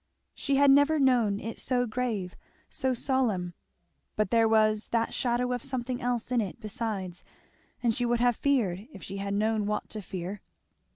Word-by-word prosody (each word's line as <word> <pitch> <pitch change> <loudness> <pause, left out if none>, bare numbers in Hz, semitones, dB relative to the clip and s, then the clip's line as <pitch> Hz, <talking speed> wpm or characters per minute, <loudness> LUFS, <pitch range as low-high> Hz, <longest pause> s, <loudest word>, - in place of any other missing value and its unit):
She 280 - -1
had 280 0 +6
never 285 +3 +5
known 245 -7 +3
it 225 +1 -6
so 250 -1 +1
grave, 220 -6 -3 0.4
so 260 -1 -1
solemn; 230 -9 0 0.6
but 215 -2 0
there 230 -1 +4
was 215 -1 +3
that 230 -1 0
shadow 245 0 0
of 245 - -2
something 255 -2 -3
else 245 0 -2
in 245 -2 +3
it 205 +2 -5
besides, 210 -5 -4 0.6
and 235 -2 +3
she 245 +2 -1
would 240 0 +1
have 245 -1 +3
feared 220 -9 0
if 195 - -11
she 195 - -6
had 200 0 -2
known 215 0 +1
what 210 - -3
to 215 - -5
fear. 190 +1 -6
230 Hz, 175 wpm, -28 LUFS, 205-250 Hz, 0.6 s, had